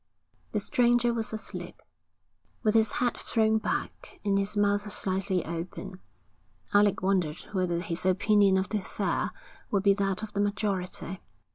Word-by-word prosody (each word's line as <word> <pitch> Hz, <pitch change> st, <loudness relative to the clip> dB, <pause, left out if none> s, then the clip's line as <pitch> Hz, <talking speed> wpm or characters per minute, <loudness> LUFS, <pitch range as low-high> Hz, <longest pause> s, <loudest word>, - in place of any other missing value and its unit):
The -, -, +2 dB
stranger 240 Hz, -3 st, +3 dB
was 225 Hz, -2 st, -2 dB
asleep, 220 Hz, 0 st, -6 dB, 0.8 s
with 215 Hz, -2 st, +3 dB
his 220 Hz, -2 st, +4 dB
head 245 Hz, -1 st, +1 dB
thrown 220 Hz, -1 st, +2 dB
back -, -, -4 dB
and 200 Hz, -1 st, +2 dB
his 200 Hz, +1 st, -1 dB
mouth 205 Hz, 0 st, +2 dB
slightly 190 Hz, -2 st, 0 dB
open. 180 Hz, +3 st, -6 dB, 0.7 s
Alec 205 Hz, -2 st, +4 dB
wondered 180 Hz, -5 st, +1 dB
whether 180 Hz, -4 st, 0 dB
his 175 Hz, -1 st, -3 dB
opinion 195 Hz, +1 st, +4 dB
of 190 Hz, +1 st, -1 dB
the 215 Hz, -, 0 dB
affair -, -, -1 dB, 0.4 s
would 200 Hz, -2 st, +1 dB
be 200 Hz, -1 st, +6 dB
that 195 Hz, 0 st, -1 dB
of 215 Hz, -, -6 dB
the 200 Hz, -, 0 dB
majority. 195 Hz, -3 st, -2 dB
200 Hz, 145 wpm, -28 LUFS, 185-215 Hz, 0.8 s, be